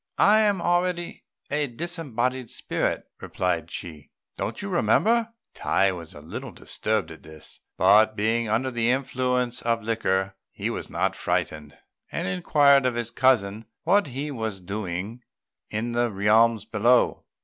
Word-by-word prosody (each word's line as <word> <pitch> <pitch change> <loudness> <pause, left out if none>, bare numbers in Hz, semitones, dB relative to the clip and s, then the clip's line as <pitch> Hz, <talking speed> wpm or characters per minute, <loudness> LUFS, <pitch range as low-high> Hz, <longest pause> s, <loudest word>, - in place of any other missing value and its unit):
"I 210 +2 +6
am 205 -5 +2
already 175 0 -1 0.3
a 145 0 +1
disembodied 130 -4 -3
spirit," - - -2
replied 85 -3 -2
Chi; 80 -4 -7 0.3
"don't - - -4
you - - -4
remember?" 225 - +2 0.2
Tai 95 0 +2
was 85 -3 -8
a 75 - -10
little 75 - -7
disturbed 110 -6 -2
at 80 - -11
this; 80 -1 -12 0.2
but, 110 +1 +5
being 110 +2 0
under 125 +5 0
the 120 -1 0
influence 125 -1 0
of 115 -1 0
liquor, 95 -4 0 0.2
he - - -4
was - - -5
not - - 0
frightened, 75 -1 -2 0.3
and - - -2
inquired 140 - +4
of 125 - -1
his 120 -1 -3
cousin 110 -5 +2 0.2
what 205 -4 +3
he 140 +3 -4
was 110 -6 -4
doing 100 +3 -5 0.5
in 110 +3 -2
the 120 0 +1
realms 110 +2 +3
below. 120 +3 +2
115 Hz, 145 wpm, -25 LUFS, 100-130 Hz, 0.5 s, I